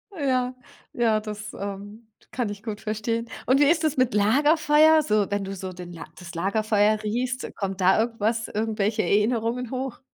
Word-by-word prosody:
Ja, 255 -4 0 0.4
ja, 225 -3 +2
das, 210 -1 -7
ähm, 205 +3 -7 0.2
kann 240 -4 -2
ich 205 -1 -7
gut 220 -2 -5
verstehen. 220 +2 -2 0.2
Und 260 +3 +4
wie - - +6
ist 320 +2 +3
das 310 -2 0
mit 255 -1 +2
Lagerfeuer? 300 +8 +4
So, 215 -7 +1
wenn 205 -1 -1
du 195 0 -5
so 185 0 -6
den 175 -2 -9 0.2
das 170 -1 -10
Lagerfeuer 210 +3 +1
riechst, 245 +4 -2
kommt 195 -2 -4
da 190 +4 +4
irgendwas 225 0 -1
irgendwelche 215 0 -1
Erinnerungen 230 +3 0
hoch? 260 -1 -4
220 Hz, 165 wpm, -25 LUFS, 205-250 Hz, 0.4 s, wie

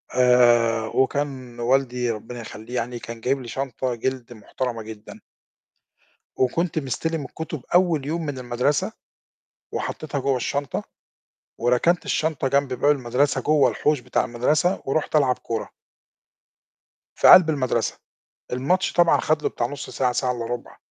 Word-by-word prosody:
آآ، 120 -3 +4
وكان 130 -2 -1
والدي- 125 0 +1
ربنا 115 +2 -7
يخليه 110 +2 -9
يعني- 120 0 -3
كان 115 0 -8
جايب 135 +3 0
لي 120 - -9
شنطة 130 0 -3
جِلد 125 0 -3
محترمة 115 +2 -4
جدًا. 110 -1 -10 1.2
وكنت 160 +6 +1
مستلم 155 +2 -2
الكتب 155 0 -7
أول 170 -6 +3
يوم 160 +1 -2
من 140 -2 -4
المدرسة، 130 - 0 0.8
وحطيتها 150 -2 -4
جوّه 135 0 +1
الشنطة، 140 +3 -2 0.7
وركنت 125 +9 +2
الشنطة 155 -4 0
جنب 140 -1 +1
باب 135 +4 +3
المدرسة 135 +1 +1
جوّه 150 +1 +4
الحوش 150 -1 +1
بتاع 125 0 -1
المدرسة 150 +10 +1
ورحت 150 +3 -1
ألعب 135 -4 +3
كرة. 115 -2 -3 1.5
في - - +4
قلب 175 -3 +9
المدرسة، 130 -6 -1 0.6
الماتش 160 +10 +1
طبعًا 175 -1 +4
خد 155 -1 0
له - - +1
بتاع 120 - -2
نص 145 +3 -7
ساعة، 125 -2 0
ساعة 125 +1 0
إلا 120 -2 -4
ربع، 120 0 -6
130 Hz, 140 wpm, -23 LUFS, 120-145 Hz, 1.5 s, قلب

